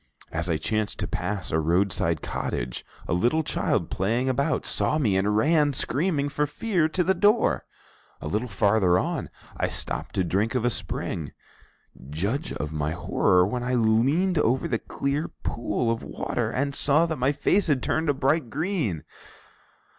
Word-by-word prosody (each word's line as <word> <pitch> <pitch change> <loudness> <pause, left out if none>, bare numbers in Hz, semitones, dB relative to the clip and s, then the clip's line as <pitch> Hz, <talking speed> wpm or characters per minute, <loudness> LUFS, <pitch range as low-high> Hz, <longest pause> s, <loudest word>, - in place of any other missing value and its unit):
As 80 +2 -2
I 80 - +2
chanced 105 +7 -2
to - - -1
pass 100 -3 -3
a 80 - +2
roadside 85 -1 +1
cottage, - - -3 0.2
a - - 0
little 120 - +2
child - - -1
playing 115 +7 0
about 140 +4 0
saw 155 - +1
me 110 -11 +2
and 105 +2 +2
ran, 150 +3 +3
screaming 145 +3 +1
for 150 0 -1
fear, 175 +1 0
to 180 +3 +1
the 190 - +3
door. 210 +4 +2 0.5
A - - -6
little 105 +10 -1
farther 100 -3 +3
on, - - -2 0.3
I - - +1
stopped - - -4
to 95 - +2
drink 100 +7 0
of 125 -2 +1
a 120 - +3
spring. 80 -6 -4 0.8
Judge 105 - -2
of 75 +1 -4
my 75 0 -1
horror 90 +2 +2
when 120 +5 -2
I 125 +1 0
leaned 135 +11 +2
over 130 -1 +1
the 115 - -1
clear 140 +3 -2 0.2
pool 115 0 -1
of 115 +1 -2
water 120 -3 -3
and 140 +4 -1
saw 150 +4 +3
that 160 -4 -3
my 130 +3 +3
face 180 +7 +2
had 140 -5 +1
turned 160 -1 0
a - - +4
bright 135 0 +1
green! 150 - -2
120 Hz, 170 wpm, -26 LUFS, 95-150 Hz, 0.8 s, a